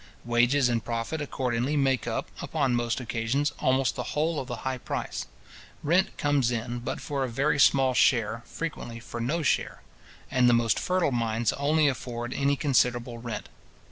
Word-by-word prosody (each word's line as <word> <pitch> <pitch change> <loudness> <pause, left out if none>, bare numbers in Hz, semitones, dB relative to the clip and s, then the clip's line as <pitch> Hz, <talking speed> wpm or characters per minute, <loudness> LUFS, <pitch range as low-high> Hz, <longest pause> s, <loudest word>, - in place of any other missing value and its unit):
Wages 120 +3 +3
and 115 -2 0
profit 115 +7 -3
accordingly 130 0 -1
make 135 -3 +1
up, 115 - -2
upon 140 -5 0
most 120 0 0
occasions, 125 +4 -1
almost 130 0 +2
the - - -3 0.2
whole 155 0 +1
of 130 - -5
the 120 - -4
high 130 -1 -1
price. - - -4 0.6
Rent 175 +6 +2
comes 145 -4 +2
in 120 0 -3
but 120 - -4
for 140 -3 -2
a 130 - -2
very 140 +4 +1
small 135 -1 +5
share, 115 -2 +2
frequently 135 -8 -5
for 120 0 -7
no 155 +8 -1
share; 135 - 0 0.5
and 125 -2 +4
the 120 - +5
most 115 -1 +2
fertile 180 -5 +1
mines 115 -1 0
only 150 +2 +2
afford 120 -2 -3
any 140 0 +1
considerable 125 -4 +1
rent. 120 -1 -5
125 Hz, 170 wpm, -27 LUFS, 120-140 Hz, 0.6 s, small